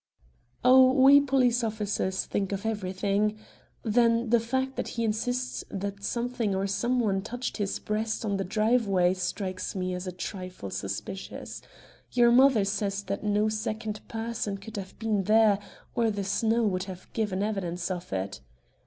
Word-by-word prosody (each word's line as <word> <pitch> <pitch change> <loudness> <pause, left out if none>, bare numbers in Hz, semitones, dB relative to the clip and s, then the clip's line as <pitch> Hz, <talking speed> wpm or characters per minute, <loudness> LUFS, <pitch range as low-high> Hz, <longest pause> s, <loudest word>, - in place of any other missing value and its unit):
"Oh, 255 0 +7
we 275 +1 +7
police 255 -3 +2
officers 210 -3 -1
think 195 -1 -2
of 200 +1 -3
everything. 205 0 0 0.5
Then 230 0 +2
the 235 - +6
fact 260 +3 -1
that - - -3
he 230 - +1
insists 245 +3 -1
that 200 +1 -5
something 235 -3 -1
or 190 +1 0
some 235 +6 0
one 200 -5 +1
touched 245 +4 -4
his 205 -3 -1
breast 220 +2 -2
on 200 -2 0
the 195 - -1
driveway 205 -3 +2
strikes 185 +1 -3
me 185 -1 -2
as 180 +1 -5
a - - -2
trifle 180 - -6
suspicious. 100 - -5 0.5
Your 240 -1 +5
mother 250 -4 +5
says 200 0 -1
that 200 +1 -4
no 210 0 +2
second 215 0 -3
person 225 -3 -3
could 210 +3 -10
have 190 -1 -7
been 210 -3 0
there, 215 -1 +5 0.3
or 230 -1 +2
the 205 -2 -2
snow 225 +4 +1
would 185 -3 0
have 185 -2 -10
given 205 -3 -1
evidence 180 -4 -2
of 180 -1 -5
it." 95 -5 -3
210 Hz, 160 wpm, -28 LUFS, 195-230 Hz, 0.5 s, Oh